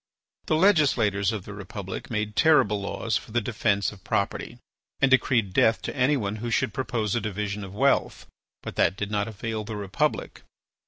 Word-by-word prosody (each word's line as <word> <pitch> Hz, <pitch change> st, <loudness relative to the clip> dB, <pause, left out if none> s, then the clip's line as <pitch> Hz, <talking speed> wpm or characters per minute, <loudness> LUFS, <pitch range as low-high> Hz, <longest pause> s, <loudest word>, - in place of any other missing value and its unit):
The 155 Hz, -, +2 dB
legislators 135 Hz, -, +3 dB
of 105 Hz, -4 st, -5 dB
the 105 Hz, -, -8 dB
Republic 100 Hz, -1 st, -7 dB
made 105 Hz, -2 st, -2 dB
terrible 105 Hz, -, +4 dB
laws 100 Hz, +1 st, -1 dB
for -, -, -10 dB
the 120 Hz, -, +2 dB
defence 105 Hz, -3 st, 0 dB
of 100 Hz, -3 st, -15 dB
property, 105 Hz, +4 st, -2 dB, 0.4 s
and 135 Hz, -1 st, +3 dB
decreed 115 Hz, -6 st, +3 dB
death 110 Hz, +4 st, +4 dB
to -, -, -4 dB
anyone 125 Hz, -6 st, +1 dB
who 120 Hz, +2 st, -4 dB
should 110 Hz, -2 st, 0 dB
propose 110 Hz, -5 st, -2 dB
a 120 Hz, -, 0 dB
division 105 Hz, 0 st, -3 dB
of 95 Hz, 0 st, -9 dB
wealth. 135 Hz, +5 st, +1 dB, 0.4 s
But -, -, -7 dB
that 95 Hz, -, +2 dB
did 105 Hz, 0 st, -3 dB
not 105 Hz, 0 st, 0 dB
avail 110 Hz, 0 st, -4 dB
the 110 Hz, +1 st, -6 dB
Republic. 100 Hz, -2 st, -2 dB
105 Hz, 175 wpm, -26 LUFS, 100-120 Hz, 0.4 s, terrible